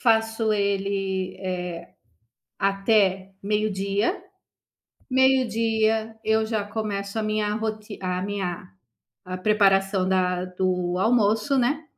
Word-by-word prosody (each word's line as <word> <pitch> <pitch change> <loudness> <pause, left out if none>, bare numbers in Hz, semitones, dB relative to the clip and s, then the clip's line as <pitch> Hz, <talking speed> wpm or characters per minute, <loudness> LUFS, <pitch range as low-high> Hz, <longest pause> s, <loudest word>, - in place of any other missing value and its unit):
Faço, 225 -1 +2
ele, 195 -2 -1
eh, 180 -2 -4 0.7
até 195 -1 +2
meio-dia. 205 - 0 0.9
Meio-dia 225 -4 +2
eu 220 0 +2
já 220 -2 -1
começo 205 -1 -4
a - - 0
minha 215 -1 0
roti 215 -1 -4
a 180 0 -1
minha 190 - -4 0.6
a 185 0 -5
preparação 195 -1 +3
da 180 -1 +1
do 180 -1 -1
almoço, 220 +4 +2
né. 280 +6 +1
205 Hz, 100 wpm, -24 LUFS, 190-220 Hz, 0.9 s, preparação